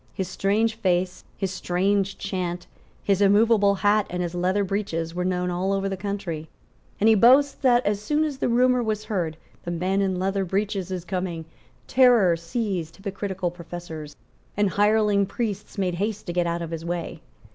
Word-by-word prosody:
His 190 - -2
strange 205 +4 +1
face, 185 -4 -1
his 195 -2 -2
strange 195 +1 0
chant, 180 -3 -3 0.4
his 200 -1 +1
immovable 205 0 +4
hat 205 0 +4
and 180 0 -2
his 175 -1 -4
leather 185 +3 +1
breeches 185 -5 -2
were 180 +1 -2
known 180 0 -1
all 185 +2 -1
over 195 0 0
the 195 - -2
country; 190 -5 -4 0.5
and 215 - +3
he 225 - +7
boasts 260 +6 +6
that, 250 -2 +2
as 205 0 0
soon 300 +8 +1
as 290 -4 -3
the - - 0
rumour 250 +1 +3
was 215 -2 -2
heard, 175 -7 -2 0.3
"The - - -5
Man 185 +3 0
in 190 -2 0
Leather 195 +1 0
Breeches 195 0 -2
is 180 -2 -4
coming," 180 -3 -3 0.4
terror 240 -9 +5
seized 170 -1 -3
hypocritical 195 -2 -3
professors, 170 -3 -8 0.4
and 205 -2 +2
hireling 205 -1 +3
priests 210 -1 -4
made 185 -2 0
haste 205 +4 -3
to 175 - -4
get 175 -1 +1
out 170 0 -2
of 165 - -6
his 165 -1 -5
way. 170 0 -4
195 Hz, 180 wpm, -24 LUFS, 175-210 Hz, 0.5 s, he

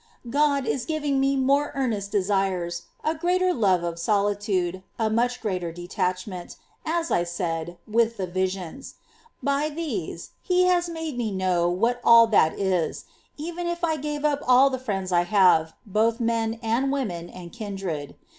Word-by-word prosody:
5. 235 - -9
God 285 -1 +2
is 240 +2 -1
giving 295 -3 0
me 275 +1 +2
more 275 +2 +2
earnest 220 -7 -1
desires, 190 -4 0 0.2
a - - +1
Kindred. 320 0 -3
greater 365 +1 +2
love 190 - +2
of 170 -1 -3
solitude, 200 -2 0 0.2
a 220 -2 0
much 245 +2 +1
greater 185 -6 -2
detachment, 180 +1 -4 0.3
as 335 +1 -1
I 175 - +3
said, 170 0 -3
with 230 +1 +1
the 190 - -2
visions; 185 +5 -4 0.5
by 280 +2 +1
these 270 - -5
He 365 0 +2
has 355 -1 +2
made 320 -6 -4
me 230 -2 0
know 185 -2 +1
what 230 +7 0
all 230 0 +8
that 200 -8 +3
is, 185 -4 -1 0.3
even 345 +3 -4
if 345 0 -3
I 320 -2 +2
gave 295 0 -3
up 290 -1 +2
all 260 +2 +6
the 260 - -2
friends 195 -7 -3
I 175 -1 +4
have, 175 -4 +4
both 225 +3 +1
men 230 -1 0
and 235 +5 +1
women 185 -12 -3
and 175 -2 -10
kindred. 195 -10 -5
220 Hz, 165 wpm, -25 LUFS, 185-275 Hz, 0.5 s, all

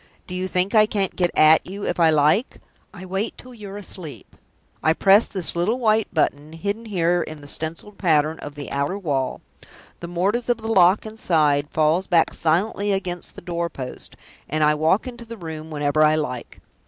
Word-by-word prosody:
Do 180 - -8
you 185 +1 -2
think 185 +1 -1
I 215 -1 +6
can't 200 -3 -2
get 175 -1 +1
at 155 +1 +6
you 200 +2 -7
if 175 - -2
I 165 -1 +5
like? 155 - +2 0.3
I 185 -2 -10
wait 195 +4 -3
till 255 0 -12
you're 205 -3 -9
asleep 185 -6 -6 0.5
I 160 - +3
press 195 +5 +5
this 185 -4 -1
little 190 +8 +1
white 220 -3 +1
button, 155 -2 -1
hidden 200 +7 -4
here 175 -4 +1
in 155 -2 -7
the 145 - -12
stencilled 165 +7 -4
pattern 155 -3 +2
of 145 - -8
the 145 -1 -7
outer 140 +7 -1
wall 145 -9 -2 0.6
the 170 - -7
mortise 200 +8 -1
of 240 - +2
the 225 0 -4
lock 185 +2 +5
inside 155 -9 +1
falls 160 +4 +1
back 165 -2 +3
silently 195 +5 0
against 185 -3 -3
the - - -10
door 170 -1 -3
post 130 -5 -8 0.3
and 155 +1 0
I 150 0 +4
walk 160 - +2
into 240 -2 -8
the 230 0 -9
room 160 -3 -7
whenever 145 0 0
I 155 0 +4
like. 125 -6 -4
175 Hz, 190 wpm, -22 LUFS, 155-200 Hz, 0.6 s, I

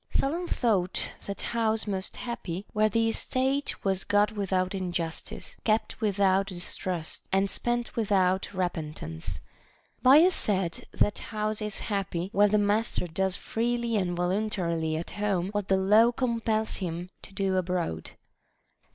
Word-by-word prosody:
Solon 335 +6 0
thought 200 - +1 0.2
that 200 -1 -5
house 225 -2 +1
most 195 -2 -4
happy 200 -6 -4
where 215 0 +3
the 225 +2 +2
estate 265 +4 -1
was 190 -1 +1
got 205 +1 +3
without 190 -3 0
injustice, 175 -3 -4
kept 220 +1 0
without 195 -2 +3
distrust, 180 -2 -4
and 195 +1 +2
spent 240 0 -1
without 195 -4 +2
repentance. 155 - -4 0.6
Bias 310 +8 +7
said, 190 - 0
That 205 - +1
house 215 0 -2
is 210 -1 -3
happy 195 -4 -2
where 205 +1 +5
the 210 - +3
master 205 -1 +1
does 185 +2 -1
freely 235 +1 -1
and 180 -4 0
voluntarily 175 -4 0
at 165 - -5
home 195 -3 0
what 205 -1 -2
the 190 - +3
law 210 +5 +5
compels 230 -3 0
him 175 -1 -4
to - - -13
do 195 -1 0
abroad. 175 - -1
200 Hz, 135 wpm, -28 LUFS, 185-220 Hz, 0.6 s, Bias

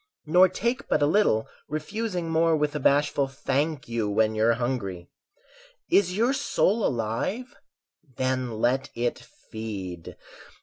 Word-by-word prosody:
Nor 180 +4 +5
take 235 +7 -2
but - - +2
a - - +5
little, 150 - +2 0.2
refusing 175 +4 -3
more 165 0 +3
With 150 -1 0
a - - -1
bashful 140 0 +2
"Thank 140 +2 -2
you", 115 -3 -1
when 110 +1 +2
you're 110 +2 +3
hungry. 100 -8 -3 0.8
Is 185 -1 +3
your 240 +5 +3
soul 230 -5 +1
alive? 125 - -2 0.6
Then 130 -3 -1
let 130 +4 +1
it 120 0 -1 0.3
feed! 95 -6 -6
140 Hz, 130 wpm, -26 LUFS, 115-180 Hz, 0.8 s, Nor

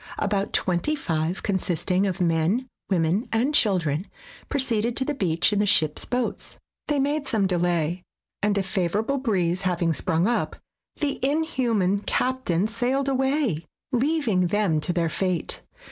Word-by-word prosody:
About 200 -1 0
twenty 185 - +1
five, 165 - -2
consisting 190 0 0
of 190 0 -3
men, 175 +8 +1 0.2
women 185 +6 +1
and 245 +6 +1
children, 180 - +2 0.4
proceeded 235 -4 0
to 265 - +2
the 295 - -1
beach 180 - +1
in 205 - +1
the 205 - +2
ship 155 -6 +3
's - - -7
boats. 250 0 -3 0.3
They 295 - +1
made 280 +1 0
some 215 -3 +1
delay, 175 -2 0 0.4
and 205 0 +1
a 195 - +1
favorable 205 +8 0
breeze 185 -8 0
having 175 -3 +1
sprung 160 +3 0
up, 240 +3 0 0.4
the 290 -3 -2
inhuman 250 - +1
captain 210 -6 0
sailed 250 +5 0
away, 265 - +1 0.3
leaving 250 - +1
them 185 -5 +1
to 175 - -1
their 170 -1 +1
fate. 180 0 -2
200 Hz, 145 wpm, -25 LUFS, 175-255 Hz, 0.4 s, ship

